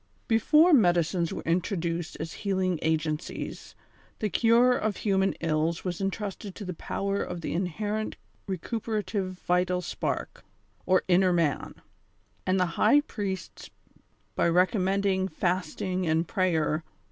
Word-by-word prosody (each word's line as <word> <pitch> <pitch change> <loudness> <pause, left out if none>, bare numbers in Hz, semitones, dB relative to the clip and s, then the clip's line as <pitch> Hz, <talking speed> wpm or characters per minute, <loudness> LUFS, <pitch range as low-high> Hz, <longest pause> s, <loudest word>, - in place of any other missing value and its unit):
Before 300 +10 +5
medicines 175 - +3
were - - -5
introduced 170 -1 -1
as 160 +1 -5
healing 185 -4 0
agencies, 155 -1 -3 0.4
the 210 -2 -2
cure 235 +5 +4
of 215 -4 -1
human 195 -2 +1
ills 165 +1 0
was 180 0 -3
entrusted 195 0 -4
to 205 - -7
the 180 - -4
power 200 +4 -2
of 175 -1 -4
the - - -3
inherent 205 +5 -2 0.3
recuperative 205 0 -2
vital 180 0 +2
spark, 180 - -4 0.4
or 185 0 +4
inner 185 0 +4
man* 165 -5 0 0.7
and 185 +1 +2
the 180 - +3 0.2
high 290 - +6
priests, 200 - -5 0.6
by - - +2
recommending 190 +1 +2
fasting 185 0 -1
and 160 +1 +1
prayer. 160 -4 +1
185 Hz, 125 wpm, -28 LUFS, 170-200 Hz, 0.7 s, high